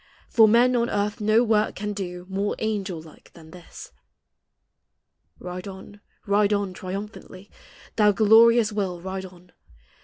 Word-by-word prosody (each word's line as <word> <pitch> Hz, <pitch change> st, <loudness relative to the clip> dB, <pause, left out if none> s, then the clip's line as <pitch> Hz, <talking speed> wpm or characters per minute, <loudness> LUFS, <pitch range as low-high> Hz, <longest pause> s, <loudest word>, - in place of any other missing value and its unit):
For 225 Hz, -2 st, +5 dB
men 240 Hz, +3 st, +4 dB
on 235 Hz, -1 st, 0 dB
earth 205 Hz, +1 st, -2 dB
no 215 Hz, +3 st, +3 dB
work 215 Hz, -2 st, +1 dB
can 210 Hz, +1 st, -4 dB
do 180 Hz, -3 st, -6 dB
More 195 Hz, +2 st, -2 dB
angel 200 Hz, -5 st, -3 dB
like 155 Hz, -1 st, -17 dB
than 160 Hz, -2 st, -15 dB
this. 175 Hz, 0 st, -12 dB, 1.5 s
Ride 180 Hz, +1 st, -8 dB
on, 195 Hz, +1 st, -11 dB, 0.2 s
ride 205 Hz, +1 st, +2 dB
on, 200 Hz, -2 st, -2 dB
triumphantly, 190 Hz, +1 st, -8 dB, 0.5 s
Thou 210 Hz, -1 st, +5 dB
glorious 225 Hz, +2 st, +5 dB
will, 195 Hz, -4 st, -3 dB
ride 190 Hz, +1 st, -6 dB
on 180 Hz, -1 st, -16 dB
205 Hz, 140 wpm, -24 LUFS, 185-215 Hz, 1.5 s, For